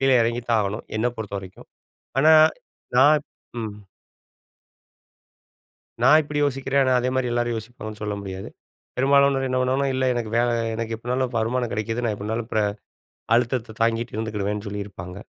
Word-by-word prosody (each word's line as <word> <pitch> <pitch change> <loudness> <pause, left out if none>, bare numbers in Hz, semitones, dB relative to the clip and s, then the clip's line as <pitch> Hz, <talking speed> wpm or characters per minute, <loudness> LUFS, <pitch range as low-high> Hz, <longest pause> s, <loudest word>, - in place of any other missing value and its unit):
கீழே 135 -1 +4
இறங்கி 120 +1 -1
தான் 115 -1 +3
ஆகணும், 100 +3 -4
என்னை 120 +3 +2
பொறுத்தவரைக்கும். 100 -3 -7 0.5
ஆனா 155 +3 +6 0.6
நான் 145 +4 +6 0.4
ம். 110 -2 -5 2.3
நான் 145 +6 +7
இப்படி 145 0 -3
யோசிக்கிறேன். 135 0 +1
ஆனா, 130 -1 +2
அதே 125 - 0
மாரி 130 -2 0
எல்லாரும் 120 0 0
யோசிப்பாங்கன்னு 110 -1 -8
சொல்ல 105 -1 -2
முடியாது. 95 -1 -6 0.5
பெரும்பாலானோர் 140 0 +4
என்ன 130 - 0
பண்ணுவாங்கன்னா, 135 +2 +1
இல்ல 130 0 +1
எனக்கு 120 -3 -3
வேல 120 0 +3 0.3
எனக்கு 115 0 -3
எப்படினாலும் 125 +2 -2
வருமானம் 120 +1 0
கிடைக்குது, 115 +3 -2
நான் 110 -2 0
எப்படினாலும் 110 +3 -4
பிற 110 - +3 0.7
அழுத்தத்த 120 -2 -1
தாங்கிட்டு 115 0 0
இருந்துக்கிடுவேன்னு 105 -1 -2
சொல்லியிருப்பாங்க. 100 -3 -6
115 Hz, 140 wpm, -24 LUFS, 110-130 Hz, 2.3 s, நான்